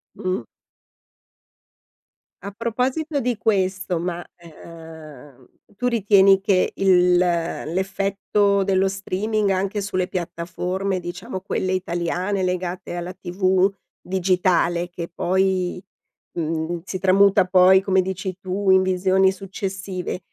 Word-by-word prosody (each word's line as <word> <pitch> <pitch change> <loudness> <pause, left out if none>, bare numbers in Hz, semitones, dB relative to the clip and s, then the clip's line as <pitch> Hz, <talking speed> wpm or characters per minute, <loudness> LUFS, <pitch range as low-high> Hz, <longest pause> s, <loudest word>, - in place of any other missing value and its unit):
Mh. 185 - -3 2.0
A 200 - -6
proposito 255 +8 -2
di 240 -2 -1
questo, 190 -4 0
ma, 175 0 -3
ehm, 160 -5 -13 0.3
tu 250 +4 -1
ritieni 200 -4 +4
che 195 -2 +1
il 180 -2 +4
l'effetto 195 +4 0
dello 195 0 +2
streaming 200 +2 -1
anche 195 +2 -1
sulle 185 -2 -2
piattaforme, 180 +2 -3
diciamo, 185 +5 -6
quelle 190 -1 -2
italiane 185 +2 -2
legate 180 -1 -3
alla 175 +1 -5
TV 185 +1 +1 0.3
digitale, 180 -2 +1
che 175 -1 -7
poi, 185 0 0 0.5
mhmm, 165 +1 -2
si 185 0 -5
tramuta 195 0 +4
poi, 185 +1 +5
come 190 -1 +2
dici 185 0 -4
tu, 190 +1 -2
in 190 0 +6
visioni 190 +1 +2
successive, 190 -1 -5
185 Hz, 105 wpm, -22 LUFS, 180-195 Hz, 2.0 s, in